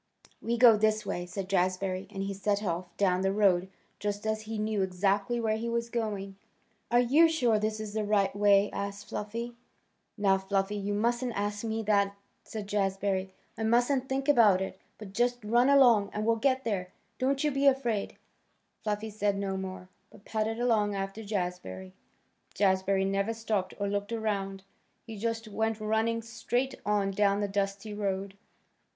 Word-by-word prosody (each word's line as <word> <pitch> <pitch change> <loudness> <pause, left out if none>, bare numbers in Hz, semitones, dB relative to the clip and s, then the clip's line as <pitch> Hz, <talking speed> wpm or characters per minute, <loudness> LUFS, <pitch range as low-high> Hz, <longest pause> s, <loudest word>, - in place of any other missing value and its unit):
"We 235 +1 -1
go 230 -2 +7
this 215 0 +1
way," 175 0 -3
said 190 +1 -5
Jazbury, 185 0 0
and 195 -2 -4
he 200 0 -3
set 200 +1 -1
off 175 -1 -2
down 185 -2 +2
the 190 0 +1
road 190 -3 +3 0.3
just 205 +1 -3
as 220 0 0
if - - -10
he 220 0 -4
knew 215 -1 0
exactly 200 +5 0
where 220 -1 0
he 230 +1 -3
was 235 0 -2
going. 205 -4 -3 0.5
"Are 240 - +4
you 290 +7 +5
sure 245 -9 +2
this 215 0 -1
is 215 -1 -6
the 215 0 -1
right 200 -2 +1
way?" 205 0 +4
asked 200 +1 -5
Fluffy. 230 +3 -4 0.6
"Now, 195 -2 +3
Fluffy, 195 +1 -1
you 205 0 -2
mustn't 240 +3 0
ask 205 +1 -2
me 225 0 -2
that," 200 -1 +2 0.3
said 215 -2 -6
Jazbury. 195 -1 0 0.3
"I - - -7
mustn't 245 +4 +2
think 270 +1 -1
about 225 -10 +6
it, 190 0 -5 0.2
but 200 -3 -10
just 245 +3 +1
run 240 +5 +3
along, 240 -8 +6
and 210 +1 -2
we'll 230 0 +3
get 260 +2 +1
there. 195 -5 -2 0.3
Don't 270 +2 +1
you 300 - +2
be 275 +1 +2
afraid." 240 -6 +1 0.7
Fluffy 215 0 -2
said 205 -1 0
no 195 -1 -2
more, 190 -1 -6 0.2
but 200 - -18
padded 220 +1 -2
along 215 -4 +2
after 195 +2 -4
Jazbury. 180 - -4 0.6
Jazbury 190 0 +2
never 200 +3 0
stopped 215 -4 -2
or 200 - -1
looked 205 +1 -2
around. 200 -4 -2 0.4
He 225 - -8
just 225 +1 -3
went 220 +1 -1
running 220 +2 0
straight 235 +3 -2
on 205 -1 +1
down 200 0 +2
the 205 - 0
dusty 200 +1 -2
road. 195 -1 -2
210 Hz, 175 wpm, -29 LUFS, 195-225 Hz, 0.7 s, go